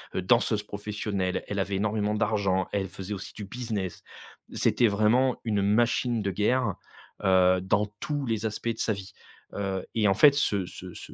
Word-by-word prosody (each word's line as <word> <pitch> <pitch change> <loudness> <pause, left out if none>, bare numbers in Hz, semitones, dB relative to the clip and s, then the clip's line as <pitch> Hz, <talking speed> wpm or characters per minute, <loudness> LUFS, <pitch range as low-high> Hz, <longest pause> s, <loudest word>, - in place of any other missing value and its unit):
heu, 95 - 0
danseuse 110 0 +2
professionnelle, 105 -2 -3
elle 100 -1 -3
avait 95 +1 -1
énormément 105 +1 0
d'argent, 100 -4 +1
elle 100 -2 -1
faisait 95 +2 -6
aussi 95 - -7
du 105 - -6
business. 105 -5 -4 0.5
C'était 120 - +2
vraiment 110 +5 +2
une 105 -3 0
machine 115 +2 +2
de 100 - -1
guerre. 105 +2 +1 0.5
Heu, 95 -1 +4
dans 100 +3 +1
tous 145 -2 -2
les 115 -2 -1
aspects 110 +2 -4
de 115 - -3
sa 110 - +1
vie. 95 -1 -9 0.4
Heu, 95 -2 -3
et 105 -2 +3
en 95 - +4
fait 145 +4 +7
ce 100 -9 +1
ce 90 0 -9
ce - - -10
105 Hz, 180 wpm, -27 LUFS, 95-110 Hz, 0.5 s, fait